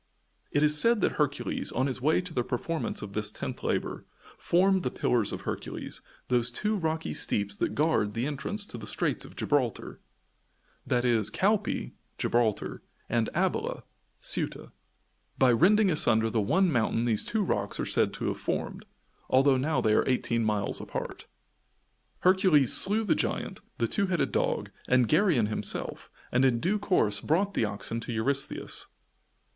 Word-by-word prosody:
It 145 - +1
is 150 0 +6
said 230 -1 +3
that - - +2
Hercules, 145 -1 -1
on 130 - 0
his 130 -2 -2
way 155 +6 +2
to 180 -2 -9
the 125 - 0
performance 155 +7 -3
of 100 - -8
this 105 0 0
tenth - - -6
labor, - - -3 0.3
formed 190 +2 +2
the 125 - -1
Pillars 120 -4 0
of - - -5
Hercules - - -5 0.3
those 125 -1 +1
two 210 - -1
rocky 160 -4 -2
steeps 100 -1 -1
that - - -2
guard 145 -9 +1
the 115 +2 -1
entrance 150 +9 -2
to 120 - -9
the 110 - -8
Straits - - -2
of - - -14
Gibraltar, - - -1 0.9
i.e., 120 -3 +2
Calpa 210 +2 0 0.3
(Gibraltar) 115 -3 0 0.3
and 115 -1 0
Abyla - - -1 0.4
(Ceuta) - - -1 0.7
by 130 -2 +4
rending 195 - +4
asunder 115 -7 +2
the 110 - +1
one 180 - +2
mountain 115 -2 0
these 110 -3 +1
two 220 -1 -1
rocks 100 - -2
are - - -1
said - - +1
to - - -4
have - - -4
formed, - - -4 0.4
although 135 +1 +4
now 150 +5 0
they 110 - +2
are 110 - +2
eighteen 115 -2 0
miles 105 -2 -1
apart. - - -6 0.9
Hercules 180 -7 +4
slew 210 +3 +5
the 205 - +2
giant, - - -2 0.2
the 115 - 0
two 200 - 0
headed 175 -4 0
dog - - -1 0.2
and 125 -2 +3
Geryon 155 - +3
himself, 105 -1 -4 0.2
and 125 +2 +2
in 125 -3 +3
due 205 - 0
course 145 - +1
brought 195 +6 0
the 115 - +1
oxen 105 +2 -2
to 115 - -6
Eurystheus. 135 +5 -1
130 Hz, 160 wpm, -28 LUFS, 115-180 Hz, 0.9 s, is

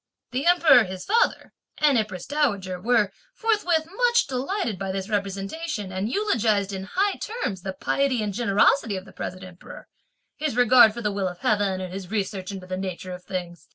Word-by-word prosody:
The 265 +6 -1
Emperor, 320 -9 +6
his 185 0 -7
father, 470 +3 +1 0.2
and 295 -3 +4
Empress 210 -6 -1
Dowager 200 -12 -1
were, 220 -2 +2 0.2
forthwith, 360 -8 +1 0.2
much 475 0 +3
delighted 260 - -2
by 195 -1 -3
this 195 +2 -4
representation, 200 - -3
and 190 +3 -2
eulogised, 220 - +1
in 190 0 -5
high 395 +2 +1
terms, 420 - -4
the 190 +1 -4
piety 255 +4 0
and 205 -1 -3
generosity 210 0 +2
of 185 - -8
the 190 - -15
present 185 +1 -6
Emperor, 180 -1 -12 0.5
his 300 -5 -2
regard 245 -2 +7
for 235 - -6
the 210 - 0
will 195 -1 -1
of 180 -1 -6
heaven 200 -3 +1
and 185 -1 -6
his 190 -2 -7
research 200 -2 -3
into 190 -2 -7
the 185 0 -4
nature 185 -1 -5
of 180 0 -9
things. 175 -4 -6
205 Hz, 185 wpm, -25 LUFS, 190-275 Hz, 0.5 s, regard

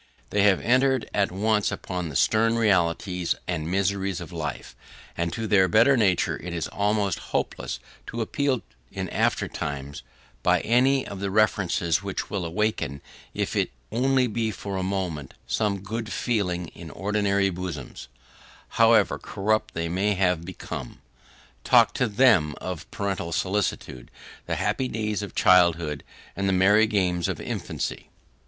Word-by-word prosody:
They 100 - +2
have 100 -2 +5
entered 130 +1 +2
at 100 -3 +1
once 105 +2 +1
upon 90 -3 -4
the 75 - -8
stern 115 - +3
realities 90 -3 +1
and 80 -3 -2
miseries 95 0 0
of 85 0 -8
life, 75 -4 -5 0.4
and 85 0 -1
to 115 - -3
their 95 -3 +4
better 115 +9 +5
nature 100 -7 +2
it 90 -1 -5
is 80 -4 -2
almost 100 -2 0 0.2
hopeless - - -3 0.3
to 115 - -5
appeal 130 +2 0 0.3
in - - -4
after - - +1
times, 70 -1 -5 0.4
by - - +3
any 130 +3 +3
of 100 - -7
the 100 0 -2
references 95 -6 +2
which - - -4
will 95 -4 -2
awaken, 95 -5 -1 0.4
if - - -2
it - - +1 0.2
be - - -6
only 125 -3 +1
for 100 -1 -5
a 95 - -1
moment, 90 -7 -3
some 100 -3 -1
good 110 +2 -5
feeling 90 -8 -1
in 85 - -11
ordinary 100 +2 0
bosoms, 85 -6 -6 0.6
however 115 -4 +4
corrupt 110 +2 -1
they 85 0 -1
may 100 +4 0
have 90 -3 +1
become. 85 -7 -7 0.6
Talk - - +5
to 125 - +1
THEM 100 - +4
of 90 -4 -6
parental 95 -4 -3
solicitude, 95 -9 -2 0.4
the - - -1
happy 130 - 0
days 105 -3 -2
of 100 - -7
childhood, 85 -5 +4 0.3
and 100 0 0
the - - +2
merry 105 +4 +5
games 90 -5 +1
of - - -3
infancy! - - -4
100 Hz, 150 wpm, -25 LUFS, 85-110 Hz, 0.6 s, have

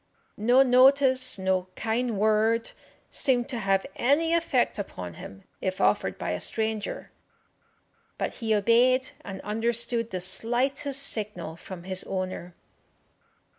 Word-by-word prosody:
No 245 +5 +5
notice, 260 0 +4
no 190 -1 -1
kind 230 0 -2
word, 220 +2 +1 0.4
seemed 245 -4 0
to 240 - -3
have 195 -2 +1
any 295 +5 +2
effect 280 -10 +1
upon 90 - -6
him 95 +3 -11 0.2
if 185 -1 -3
offered - - +1
by - - -3
a - - -2
stranger, 220 -1 -2 1.1
but - - -3
he 220 -1 +1
obeyed 245 +5 +3
and 195 -1 -7
understood 230 +1 0
the 185 - -4
slightest 260 +9 0
signal 205 - -1
from 175 +1 -10
his 185 0 -3
owner. 185 -2 -5
225 Hz, 125 wpm, -26 LUFS, 190-255 Hz, 1.1 s, No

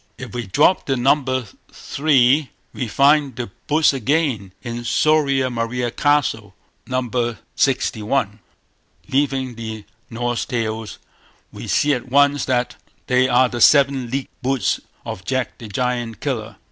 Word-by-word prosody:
If - - -9
we 120 -4 -4
drop 150 - +3
the 135 -2 +1
number 130 -1 +1 0.3
three, 140 -1 +2 0.2
we 125 - -3
find 140 +4 +3
the 120 -5 -5 0.2
Boots 155 0 +4
again 135 - 0
in 120 -1 -5
"Soria 140 -1 +2
Moria 120 +1 -2
Castle", 120 -10 0 0.3
No. 130 0 -1
lvi. 120 - -9
[Moe, 120 -1 +1
Introd., 115 - -9 0.2
xxxii 130 -4 +1 0.2
iii] 105 +1 -19 0.7
Leaving 135 -2 0
the 110 -2 -7 0.2
Norse 120 +1 -2
Tales, 110 -2 -3 0.5
we - - -9
see 145 0 +2
at 125 -1 -4
once 145 +2 +3
that 125 -2 -1 0.3
they 130 0 +2
are 125 +1 +4
the 120 -1 -5
seven 135 -3 +5
leagued 135 +2 -5
boots 130 -1 0 0.3
of 95 - -6
Jack 130 +2 -2
the 115 - -8
Giant 120 +1 -2
Killer. 110 -7 -3
125 Hz, 145 wpm, -20 LUFS, 115-140 Hz, 0.7 s, seven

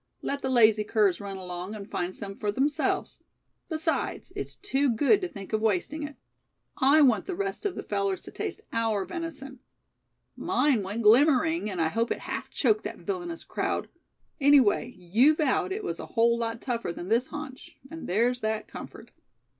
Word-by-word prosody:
Let 280 0 -2
the 265 - -2
lazy 220 -4 +5
curs 210 -3 +2
run 200 -1 -6
along, 180 +2 -6
and 200 -2 -8
find 180 -3 -3
some 195 -2 -7
for 205 0 -1
themselves. 280 +7 0 0.5
Besides, 320 0 -2
it's - - -5
too 285 -9 0
good 290 - +3
to 365 - -1
think 200 - -10
of 215 - +1
wasting 220 - 0
it. 290 -1 -6 0.7
I 280 +4 +6
want 245 -7 +4
the 375 - -3
rest 395 +2 -2
of 375 - -5
the - - -5
fellers 200 -2 -1
to - - -11
taste - - -5
our 225 -4 0
venison. 300 -7 -6 0.8
Mine 275 -7 +2
went 205 +4 -3
glimmering, 285 +4 +4
and 185 -3 -4
I 160 -1 +2
hope 230 +6 0
it - - -2
half - - -5
choked 430 0 +2
that - - -5
villainous 350 -4 -5
crowd. - - -2 0.5
Anyway 275 -6 +5
you 220 - +4
vowed 305 +4 +1
it 415 +2 -3
was - - -4
a - - -6
whole 235 0 +3
lot 230 0 -3
tougher 235 -8 -2
than 175 +2 -7
this 235 +3 +2
haunch; 290 -3 -9
and 325 0 -7
there's 235 +6 +2
that 220 -1 -2
comfort." - - -10
235 Hz, 180 wpm, -27 LUFS, 210-300 Hz, 0.8 s, I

